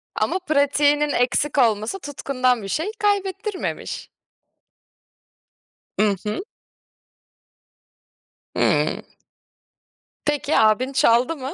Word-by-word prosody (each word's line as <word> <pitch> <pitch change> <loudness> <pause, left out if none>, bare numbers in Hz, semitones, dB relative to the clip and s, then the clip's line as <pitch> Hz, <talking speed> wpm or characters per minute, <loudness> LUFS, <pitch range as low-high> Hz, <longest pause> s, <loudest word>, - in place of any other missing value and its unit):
Ama 375 - 0
pratiğinin 295 -2 +2
eksik 275 +3 0
olması 225 - +2
tutkundan 255 -5 -1
bir - - -6
şey 325 - -2
kaybettirmemiş. 400 -1 -2 1.9
Hı 210 -2 +2
hı. 210 - -2 2.2
Hıı. - - +1 1.2
Peki, 295 0 0
abin 220 +5 +3
çaldı 250 +4 +3
mı? 270 +2 -6
285 Hz, 80 wpm, -22 LUFS, 245-320 Hz, 2.2 s, abin